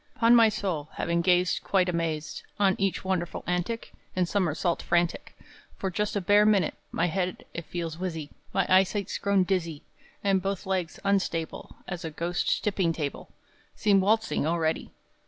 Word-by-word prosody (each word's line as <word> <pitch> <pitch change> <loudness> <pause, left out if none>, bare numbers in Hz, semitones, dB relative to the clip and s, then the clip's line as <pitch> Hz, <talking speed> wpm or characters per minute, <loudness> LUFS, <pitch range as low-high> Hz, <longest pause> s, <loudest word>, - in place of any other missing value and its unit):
'Pon 230 0 +5
my 230 -2 +7
soul, 175 -8 -3
Having 170 0 0
gazed 180 0 +3
Quite 185 -2 +2
amazed, 165 -3 -2 0.2
On 195 -2 +4
each 195 -1 0
wonderful 180 -2 -2
antic 180 +6 -2 0.2
And 185 -1 +2
summersault 175 -2 0
frantic, 175 0 0 0.4
For 190 - -2
just 210 +3 -1
a 205 - 0
bare 205 +3 +5
minute, 205 -6 +3 0.2
My - - +1
head, 180 +1 -2
it 170 - -5
feels 165 -2 -4
whizzy; 160 -5 -4 0.2
My 195 - +1
eyesight's 190 +2 +2
grown 200 -2 +3
dizzy; 170 -5 -2 0.4
And 195 -2 +2
both 195 +1 -3
legs, 185 -3 -2
unstable 190 -5 -1
As 180 -1 -5
a 165 - -3
ghost's 170 +3 -1
tipping 190 -5 0
table, 150 -3 -4 0.5
Seem 200 -3 +3
waltzing, 215 -5 +1
already! 160 -1 0
180 Hz, 155 wpm, -27 LUFS, 170-195 Hz, 0.5 s, my